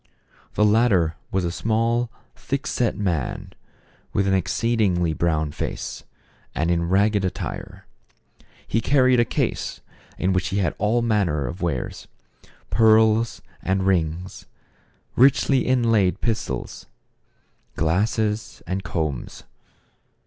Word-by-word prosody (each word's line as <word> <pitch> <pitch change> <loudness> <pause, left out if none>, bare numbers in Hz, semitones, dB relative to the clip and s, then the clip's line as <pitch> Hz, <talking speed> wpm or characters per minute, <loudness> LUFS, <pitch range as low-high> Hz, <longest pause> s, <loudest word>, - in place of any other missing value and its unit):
The 105 - +4
latter 105 -7 +3 0.2
was 95 -2 0
a 85 - -1
small, 115 +5 0 0.3
thick 140 +1 -4
set 120 -3 0
man, 90 -10 -2 0.6
with 100 - +1
an 95 - +1
ex 95 -3 0
ceedingly 95 -8 +1
brown 80 -3 0
face, - - -5 0.5
and 80 +3 +1
in 85 0 0
ragged 100 +2 +2
attire. 95 - -5 0.8
He 115 - 0
carried 130 0 +4
a 120 - +4
case, - - -2 0.4
in 95 +1 +1
which 90 0 0
he 95 - -2
had 90 -6 +1
all 110 +4 +1
manner 95 -11 +1
of 85 +10 -6
wares: 80 -8 -3 0.6
pearls 110 0 +4 0.2
and 95 0 0
rings, 90 -1 -1 0.7
richly 135 0 +4
inlaid 115 -7 +2
pistols, 115 -2 -3 0.9
glasses 105 +6 -1
and 95 +1 -3
combs. 80 -6 -4
100 Hz, 115 wpm, -23 LUFS, 85-115 Hz, 0.9 s, The